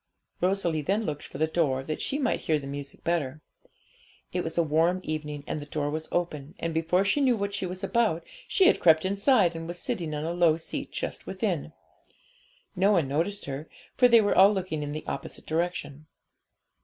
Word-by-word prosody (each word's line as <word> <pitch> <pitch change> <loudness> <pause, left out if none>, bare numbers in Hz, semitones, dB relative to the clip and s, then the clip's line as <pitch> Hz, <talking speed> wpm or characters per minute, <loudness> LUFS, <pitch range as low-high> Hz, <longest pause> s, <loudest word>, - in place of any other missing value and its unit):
Rosalie 180 -4 +1
then 200 +9 0
looked 145 -4 -4
for - - -9
the 155 - +3
door, 150 -5 0
that 155 +2 -4
she 275 - -1
might 270 -4 0
hear 155 - +1
the 140 - -7
music 140 0 -7
better. 155 -4 -1 0.9
It 180 0 0
was 165 - -5
a 170 - +4
warm 165 +4 +2
evening, 150 -2 -4
and - - -3
the 145 - -8
door 145 -1 -2
was 155 +1 -4
open, 160 -2 -2
and 165 -1 -3
before 165 +4 +2
she 285 +8 +2
knew 255 -4 +3
what 200 0 -2
she 195 -2 -2
was 185 +2 -7
about, 210 -5 +1 0.2
she 385 - +3
had - - +5
crept 160 -1 +5
inside, 200 -2 +3
and 165 0 -5
was 175 +1 -5
sitting 175 -8 -3
on 150 - -3
a 170 - -2
low 170 -3 +4
seat 165 - -6
just - - -5
within. - - -2 1.0
No 195 +3 +4
one 170 -8 +2
noticed 165 +9 -1
her, 140 +3 -6 0.3
for 250 - +6
they 235 -2 +7
were 205 - +1
all 195 +2 +8
looking 185 -6 -2
in 145 0 -4
the 155 +1 -5
opposite - - -6
direction. 155 -3 -3
165 Hz, 205 wpm, -27 LUFS, 155-195 Hz, 1.0 s, all